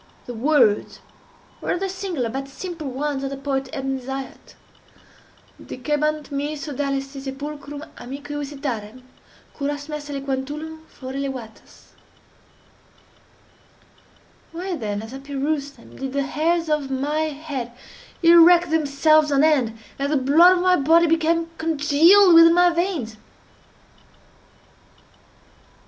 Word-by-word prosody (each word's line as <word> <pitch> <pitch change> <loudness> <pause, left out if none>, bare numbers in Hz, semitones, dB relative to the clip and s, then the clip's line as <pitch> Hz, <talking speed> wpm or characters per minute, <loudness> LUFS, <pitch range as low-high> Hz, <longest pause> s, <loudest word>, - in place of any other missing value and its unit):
The 245 - -7
words 240 -3 +2 0.6
were - - -1
the 385 +2 -2
singular 370 -9 -3
but 270 +3 -5
simple 315 +1 -7
ones 275 +1 -3
of 275 - -2
the 275 - -6
poet 270 -1 -3
Ebn 270 -3 -3
Zaiat:—"Dicebant 290 +2 -7
mihi 290 +2 -2
sodales 275 -1 -3
si 275 0 -10
sepulchrum 285 +2 -7
amicae 280 +3 -8
visitarem, 270 -5 -5 0.5
curas 290 0 -4
meas 300 -1 -6
aliquantulum 290 +3 -5
fore 260 0 -9
levatas." 265 -5 -7 2.6
Why 355 +2 -4
then, 210 -6 -4
as 225 +3 -10
I 270 - -7
perused 280 +1 -3
them, 235 - -16
did 265 0 -5
the 280 0 0
hairs 330 +4 0
of 300 -3 -1
my 280 +3 -1
head 280 -5 -6 0.5
erect 340 0 +7
themselves 310 0 +3
on 280 +1 +3
end, 260 -8 +2 0.2
and 280 +1 -1
the 300 - +3
blood 325 +8 +5
of 355 - -1
my 365 0 +4
body 325 +4 +4
become 330 0 +1
congealed 325 +5 +5
within 330 0 +8
my 355 0 +5
veins? 335 - -2
290 Hz, 120 wpm, -22 LUFS, 270-320 Hz, 2.6 s, within